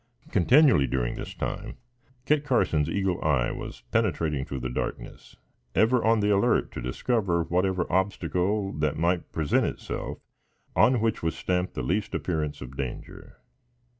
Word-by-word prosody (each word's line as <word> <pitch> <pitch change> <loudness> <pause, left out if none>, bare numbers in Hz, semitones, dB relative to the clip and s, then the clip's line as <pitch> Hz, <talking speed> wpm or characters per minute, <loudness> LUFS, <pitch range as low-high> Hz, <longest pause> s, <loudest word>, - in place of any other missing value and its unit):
Continually, 120 - +5
during - - -1
this - - -7
time, - - -4 0.5
Kit 150 -1 +2
Carson's 80 - +1
eagle 95 -3 -1
eye 65 -6 +2
was - - -7
penetrating 80 -10 +1
through 65 -2 -5
the 65 - -2
darkness, - - -5 0.4
ever 120 +2 +3
on 110 -1 +3
the 105 0 +2
alert 100 -1 +2
to - - -6
discover 85 - 0
whatever 90 +2 0
obstacle 95 +1 0
that 75 -1 -1
might 85 +2 0
present 80 -3 +1
itself - - -5 0.6
on 125 -2 +4
which 115 -1 0
was 80 0 -1
stamped 90 0 -1
the - - -3
least 100 +5 -1
appearance 80 -4 -2
of 65 +1 -8
danger. 65 -3 -7
90 Hz, 145 wpm, -27 LUFS, 75-105 Hz, 0.6 s, Continually